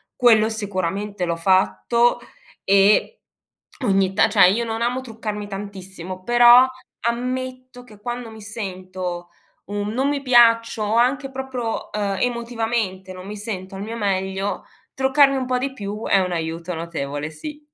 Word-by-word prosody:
quello 225 -3 +5
sicuramente 200 -2 -3
l'ho 170 -1 -1
fatto, 195 +7 +2 0.4
e 200 - +3 0.6
ogni 195 -2 +2
ta 200 - +4
cioè, 200 -4 +6
io 235 +4 0
non 225 0 -2
amo 250 +2 0
truccarmi 215 -4 -6
tantissimo, 190 -2 -7
però 240 +2 +7 0.4
ammetto 255 +1 -4
che 215 -4 -16
quando 240 +1 -5
mi 220 0 -12
sento 185 -4 -6 0.4
un 205 0 -2
non 265 +4 +1
mi 285 -1 -1
piaccio, 230 -3 +4
o 210 +1 0
anche 270 +3 +1
proprio, 260 -3 -4
ehm, 200 -2 -2
emotivamente 230 -6 -2
non 185 0 -10
mi 210 +2 -6
sento 195 -3 -6
al 195 - -6
mio 225 +3 -5
meglio, 195 -1 -2 0.3
truccarmi 275 +1 +4
un 260 -1 -2
po' 255 0 +1
di 265 +1 -2
più 210 -1 -6
è 195 - +4
un 180 -1 -1
aiuto 165 +1 -4
notevole, 150 -3 -4
sì. 295 - -8
210 Hz, 150 wpm, -22 LUFS, 190-240 Hz, 0.6 s, però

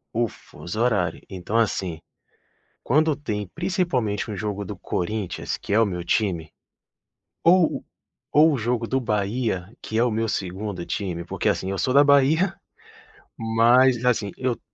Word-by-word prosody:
O 120 0 +2
fuso 95 0 -9
horário. 100 -9 +1
Então 95 +3 -3
assim, 95 -7 0 0.8
quando 155 +3 +3
tem 105 -8 -4
principalmente 165 - -1
um 105 - -4
jogo 105 -1 -3
do 100 0 -7
Corinthians 95 +2 -3
que - - -5
é 110 - +5
o 115 - +5
meu 90 -4 -4
time, 85 -8 0 0.9
ou 175 -1 +6
o - - -9 0.5
ou 155 +2 +6
o 140 - 0
jogo 120 +1 -1
do 130 +3 0
Bahia, 105 -3 -1
que 110 - -5
é 115 - +4
o 125 - +1
meu 115 +1 -1
2º 95 -1 -3
time, 90 -4 -3
porque - - -2
assim, 95 - -1
eu 100 - -3
sou 130 +5 0
da 140 +1 +7
Bahia, 145 +7 +4 0.8
mas, 120 +2 +4
assim, 115 -5 +1
eu 125 -2 -2
110 Hz, 160 wpm, -24 LUFS, 100-130 Hz, 0.9 s, da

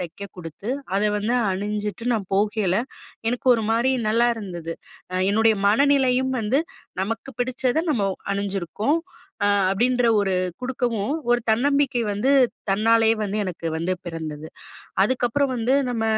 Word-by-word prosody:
தைக்க 180 +3 -6
குடுத்து, 180 +5 -7 0.3
அதை 210 +1 +2
வந்து 215 +4 0 0.2
அணிஞ்சுட்டு, 210 +2 -3
நான் 205 -5 -2
போகையில, 205 -2 +1 0.5
எனக்கு 245 +2 -3
ஒரு 225 - -1
மாரி 235 +4 +2 0.2
நல்லா 235 +2 +3
இருந்தது. 175 -6 -6 0.4
அ - - -4 0.2
என்னுடைய 220 +1 +4
மனநிலையும் 260 +1 +3
வந்து, 230 +7 +1 0.4
"நமக்கு 230 +6 -4
பிடிச்சத, 255 +3 0
நம்ம 225 -8 +1 0.3
அணிஞ்சிருக்கோம்." 200 - -1 0.5
அ - - +4 0.2
அப்பிடின்ற 245 +4 +2
ஒரு 195 -2 0 0.3
குடுக்கவும், 245 -3 -1 0.2
ஒரு 245 0 +4
தன்னம்பிக்கை 270 +1 +2
வந்து 210 +7 +1 0.4
தன்னாலயே 225 +2 +4
வந்து 205 +1 -3
எனக்கு 175 -3 -5
வந்து 170 +3 -1
பிறந்தது. 160 -2 -5 0.6
அதுக்கப்புறம் 260 +4 +1
வந்து 235 +3 0 0.2
நம்ம 225 -2 -1
225 Hz, 130 wpm, -23 LUFS, 200-245 Hz, 0.6 s, என்னுடைய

